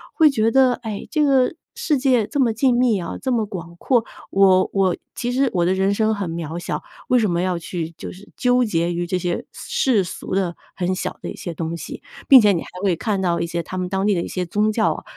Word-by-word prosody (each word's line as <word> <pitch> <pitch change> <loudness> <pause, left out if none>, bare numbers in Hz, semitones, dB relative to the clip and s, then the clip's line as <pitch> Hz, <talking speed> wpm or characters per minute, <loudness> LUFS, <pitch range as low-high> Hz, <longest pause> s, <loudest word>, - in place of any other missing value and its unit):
会 315 -2 +6
觉 225 -5 +1
得， 260 0 +4
哎， 220 -4 -6
这 305 -2 +2
个 270 +1 +3 0.2
世 470 -12 0
界 255 -4 +2
这么 255 -6 +1
静 250 +2 +2
谧 225 -8 +2
啊， - - -5
这么 240 -5 0
广 170 -4 -8
阔， 240 0 +1 0.2
我 190 -1 +4
我 190 -3 +2 0.2
其 245 0 -2
实 265 0 +2
我 175 -2 +2
的 185 - +2
人 190 +1 +1
生 220 +1 +1
很 195 -4 -3
渺 165 -1 -5
小， - - -4 0.3
为 250 - +4
什 215 -3 +1
么 170 0 0
要 180 -1 0
去 165 -1 -4
就 - - -7
是 190 +2 -15
纠 250 0 +3
结 170 -5 0
于 175 +1 -2
这 185 +1 0
些 175 -1 -2
世 230 -8 0
俗 180 - -7
的 185 -3 0 0.2
很 185 0 -1
小 - - -4
的 - - -4
一 - - -8
些 175 - -6
东 165 +1 -4
西。 170 - -8 0.3
并 270 -3 +11
且 210 -2 +5
你 170 - -1
还 - - -9 0.2
会 185 -4 +2
看 200 +1 -2
到 175 -2 +1
一 - - -1
些 170 0 -3
他 185 - -7
们 180 -1 -2
当 195 +1 -1
地 210 - +3
的 170 - 0
一 - - -4
些 180 -1 -3
宗 210 +5 +1
教 220 0 +2
啊， - - -9
195 Hz, 275 characters per minute, -21 LUFS, 175-245 Hz, 0.3 s, 并